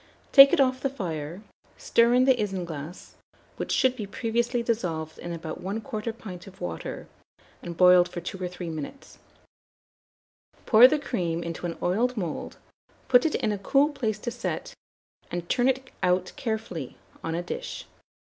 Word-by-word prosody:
Take 275 -1 +10
it 350 - +2
off 260 -1 +2
the 275 - 0
fire; 170 - -5 0.3
stir 235 +1 +3
in 255 +1 +5
the 265 - +6
isinglass, 175 -5 -5 0.4
which - - -4
should 260 -1 +3
be 215 -5 -5
previously 235 +3 -1
dissolved 170 -9 -2
in 175 - -6
about 165 -1 -6
1/4 220 +3 -4
pint 185 -4 -9
of 190 - -14
water, 85 -2 -5 0.6
and 170 -1 -7
boiled 180 -1 +6
for 175 - -5
2 190 +2 -7
or - - 0
3 180 0 -7
minutes; 160 - -8 1.5
pour 235 +2 +9
the 305 +3 +1
cream 175 - -2
into 170 +1 -4
an 165 - -5
oiled 230 +8 +1
mould, 175 -6 -4 0.5
put 250 +4 +6
it 310 - -2
in 215 - 0
a 205 - -3
cool 275 +9 +3
place 240 -8 -2
to 240 +3 -4
set, 240 - -4 0.6
and 175 -1 -4
turn 245 0 +2
it 265 0 -1
out 180 0 +1
carefully 220 - -4 0.3
on 165 0 -2
a 175 - -2
dish. - - -6
205 Hz, 165 wpm, -26 LUFS, 175-250 Hz, 1.5 s, Take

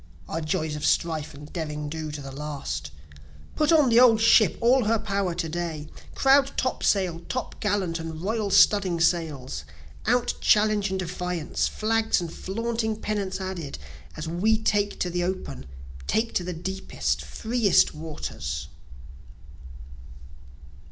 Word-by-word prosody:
(Our 165 - -3
joys 155 -1 -1
of 150 - -6
strife 160 -2 0
and 145 +1 -12
derring 150 -3 -4
do 155 +1 -4
to 150 -1 -6
the 135 - -7
last!) 140 - -5 0.7
Put 305 +1 +2
on 305 -5 +5
the 230 0 +6
old 235 -3 +7
ship 220 -4 +5
all 245 +1 +4
her 225 +2 +3
power 200 -4 -1
to 170 -1 -2
day! 160 -2 -4 0.3
Crowd 275 0 +4
top 255 - -1
sail, 185 -5 +2
top 255 - -4
gallant 195 -5 0
and 160 -1 -6
royal 210 +3 -1
studding 190 -4 +4
sails, 155 - 0 0.4
Out 245 +1 +2
challenge 210 -1 +3
and 190 - -1
defiance 180 -2 -2
flags 225 0 +1
and 170 -2 -5
flaunting 220 +2 -2
pennants 205 -3 -2
added, 185 -6 -5 0.4
As 155 +1 -5
we 195 +7 +2
take 205 -2 0
to 180 - 0
the 175 0 -1
open 185 - -4 0.4
take 230 +1 0
to 180 - 0
the 180 - -4
deepest, 190 +3 -2
freest 225 -3 +2
waters. 75 - -5
185 Hz, 145 wpm, -26 LUFS, 160-220 Hz, 0.7 s, old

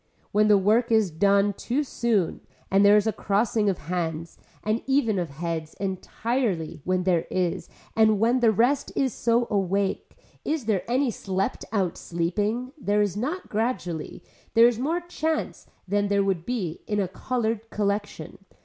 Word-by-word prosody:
When 210 +1 +3
the 210 -1 +6
work 220 +5 +2
is 220 -5 +3
done 200 +4 +3
too 255 +8 -1
soon 230 - 0 0.3
and 195 +1 +5
there 205 +1 +7
is 210 - +2
a 220 - +1
crossing 210 +2 +1
of 190 - -1
hands 165 0 -4 0.2
and 215 +2 0
even 245 -7 +2
of 175 -3 -2
heads 160 +2 -4
entirely 195 - -2
when 185 0 0
there 175 -3 +1
is 180 -2 -1 0.3
and 220 -2 +4
when 235 +4 +3
the 235 -2 +4
rest 250 +7 +1
is 265 -3 +1
so 235 +1 +1
awake, 195 -1 -1 0.3
is 305 -6 -2
there 210 -4 +1
any 255 +1 +2
slept 190 -2 -3
out 190 -6 -1
sleeping, 205 +9 -2
there 210 -4 +2
is 200 -3 -2
not 300 - -3
gradually, 210 -8 -3 0.3
there 230 +1 +8
is 240 -2 0
more 325 +7 0
chance 320 -2 -3 0.2
than 205 +2 +1
there 200 0 +2
would 190 -4 -1
be 200 -10 -3
in 210 -1 0
a 195 - +1
colored 225 +2 -2
collection. 205 -5 -3
205 Hz, 165 wpm, -25 LUFS, 185-235 Hz, 0.3 s, there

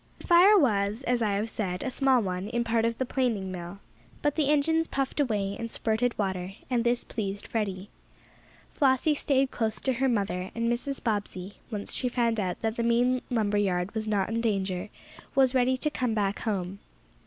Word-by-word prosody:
The - - -12
fire 370 +4 +7
was, 215 - +1
as 245 -1 0
I 210 -2 +1
have 205 +3 -1
said, 185 -5 -3
a 260 - -2
small 260 -3 +3
one, 185 +1 -3
in 235 0 0
part 230 -1 +1
of 230 0 -1
the 260 - -1
planing 230 -8 -1
mill. 175 +1 -7 0.5
But 295 -1 +2
the 295 -2 +1
engines 320 +2 +3
puffed 275 +1 -2
away, 205 -7 0
and 230 - -4
spurted 230 +2 0
water, 190 -2 -2 0.2
and 240 -2 +2
this 240 0 +2
pleased 200 -2 -4
Freddie. 200 -3 -3 0.9
Flossie 275 +1 +3
stayed 275 -2 +1
close 220 -2 0
to 265 - +1
her 265 +2 +1
mother, 195 -5 -1
and 230 0 -1
Mrs. 270 +3 -2
Bobbsey, 205 -3 -3
once 210 -3 -2
she 250 - +2
found 235 -2 +1
out 185 -3 -2
that 225 0 -1
the - - 0
main 245 +2 +2
lumber 210 -4 +1
yard 185 -1 0
was 220 -1 -3
not 205 -2 0
in 230 +1 -1
danger, 195 -3 -1 0.5
was 265 -1 +4
ready 255 0 +2
to 300 +3 0
come 245 -5 -1
back 200 -1 0
home. 195 -3 -3
225 Hz, 195 wpm, -28 LUFS, 200-255 Hz, 0.9 s, fire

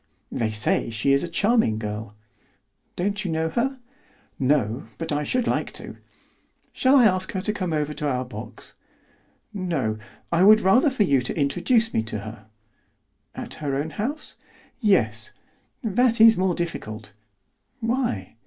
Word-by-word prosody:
"They 115 - -1
say 110 +1 +1
she 115 +5 +1
is 140 - +3
a - - -2
charming 205 - +2
girl." 105 0 -5 0.8
"Don't 200 +3 -1
you 185 - -3
know 160 0 0
her?" 265 +8 -1 0.6
"No, 130 -3 +1
but 165 - -3
I 145 0 0
should 250 - 0
like - - -1
to." - - -7 0.8
"Shall 260 +2 +3
I 255 -4 +7
ask 185 -2 +1
her 190 - -2
to 210 - -1
come 185 -4 -3
over 150 -1 -1
to 150 - -3
our 125 -1 -1
box?" 125 - -9 0.8
"No, 160 - -2 0.3
I 170 +2 +3
would 215 +2 +7
rather 235 +10 +4
for 260 -5 +1
you 140 -8 +3
to 125 - -4
introduce 180 - +2
me - - +2
to 110 -2 -5
her." 110 0 -10 0.9
"At - - -6
her 140 -2 -1
own 150 +3 -2
house?" 265 - -4 0.4
"Yes. 115 - +1 0.5
"That 235 +2 +2
is 225 0 +8
more 185 -1 +1
difficult." 110 - -5 0.7
"Why?" 230 - -2
165 Hz, 155 wpm, -24 LUFS, -, 0.9 s, is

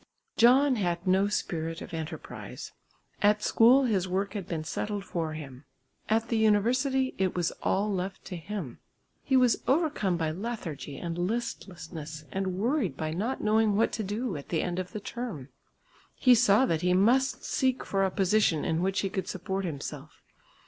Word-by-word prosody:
John 255 +3 +5
had 175 -3 -1
no 190 +2 +3
spirit 165 -5 -2
of - - -9
enterprise. 160 0 -7 0.5
At 210 +1 +3
school 250 +4 +5
his 200 -7 +1
work 190 +2 -1
had 200 -5 -5
been 160 -3 -3
settled 205 +5 -3
for 165 -4 -3
him; 140 -4 -9 0.5
at 225 +1 +1
the 230 - +1
university 255 +5 +2
it 190 -2 +1
was 175 -2 0
all 205 +2 +1
left 190 0 -4
to 180 - -6
him. 170 - -6 0.4
He 265 - +3
was 250 -2 +3
overcome 270 - +1
by 160 -2 -1
lethargy 170 - -5
and 170 0 -4
listlessness 175 -7 -4
and 190 -1 -2
worried 235 - 0
by 155 0 -2
not 215 +11 -2
knowing 215 -1 +3
what 225 +3 +2
to 220 - -3
do 210 +1 -3
at 140 - -10
the 165 - 0
end 180 0 -2
of 185 0 -5
the 215 - -5
term. 205 - -6 0.7
He 255 - +5
saw 230 0 +5
that 165 -8 0
he 180 0 +2
must 250 +8 +2
seek 260 -1 0
for 195 -1 0
a 190 - +2
position 190 -4 +2
in 160 +1 0
which 195 +2 0
he 195 - -1
could 190 - -3
support 190 +1 -3
himself. 150 -1 -7
195 Hz, 175 wpm, -28 LUFS, 170-225 Hz, 0.7 s, John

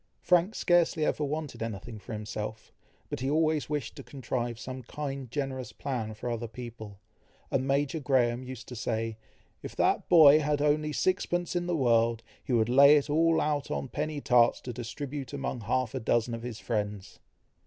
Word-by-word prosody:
Frank 180 +4 +2
scarcely 170 -3 +2
ever 150 - 0
wanted 150 -1 -4
anything 110 0 -5
for 100 +3 -9
himself, 110 0 -6 0.4
but - - -3
he 130 +2 -1
always 155 0 +1
wished 145 -6 -3
to - - -9
contrive 120 -3 -4
some 130 +2 -7
kind 135 0 -5
generous 130 -1 -3
plan 115 -6 -4
for 110 - -6
other 115 0 -3
people; 110 -3 -9 0.5
and 130 0 0
Major 140 +3 +1
Graham 125 -3 +1
used 130 -2 -8
to 125 - -7
say, 115 -1 -2 0.4
"if - - -8
that - - +1
boy 155 -3 +8
had 150 -1 0
only 150 +1 +1
sixpence 175 +1 0
in 175 0 -1
the 175 -2 0
world, 115 -3 +2 0.2
he - - -5
would 115 -3 +3
lay 140 +4 +7
it 145 0 -1
all 165 +1 +3
out 150 -2 -1
on 135 - -3
penny 150 +1 -3
tarts 120 -3 +4
to 125 - -6
distribute 135 +3 -6
among 135 -3 -3
half 120 +2 -1
a 130 - -2
dozen 120 0 +1
of 115 - -4
his 120 -2 -6
friends." 105 -4 -4
130 Hz, 180 wpm, -29 LUFS, 115-150 Hz, 0.5 s, boy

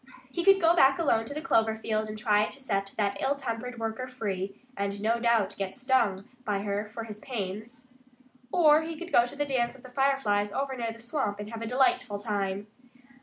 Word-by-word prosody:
He 345 - -1
could 390 +1 +6
go 335 -1 +5
back 270 -5 +6
alone 230 -9 +2
to 255 - -6
the 305 - -4
clover 225 -9 +3
field 220 -1 -2
and 215 - -5
try 210 -1 +3
to 275 - -7
set 195 -7 -1
that 200 -2 0
ill 275 +1 +2
tempered 250 -2 -4
worker 225 +3 -3
free 200 -6 -4 0.2
and 200 0 -2
no 225 +3 +1
doubt 230 -4 +2
get 195 -1 -3
stung 240 -6 +1 0.2
by 200 -3 -1
her 205 +1 -2
for 230 0 -5
his 210 -2 -8
pains. 230 +2 -5 0.6
Or 310 -3 +6
he 320 0 -5
could 350 +1 -8
go 240 - +6
to 245 - -8
the 290 0 0
dance 255 -3 0
of 265 - -16
the 255 - -11
Fireflies 250 -7 +1
over 275 -1 -2
near 230 -2 -2
the 225 - -11
swamp, 230 -3 -2
and 210 +1 -6
have 230 -1 -6
a 230 - -3
delightful 260 - +2
time. 200 -1 -2
230 Hz, 215 wpm, -28 LUFS, 205-270 Hz, 0.6 s, could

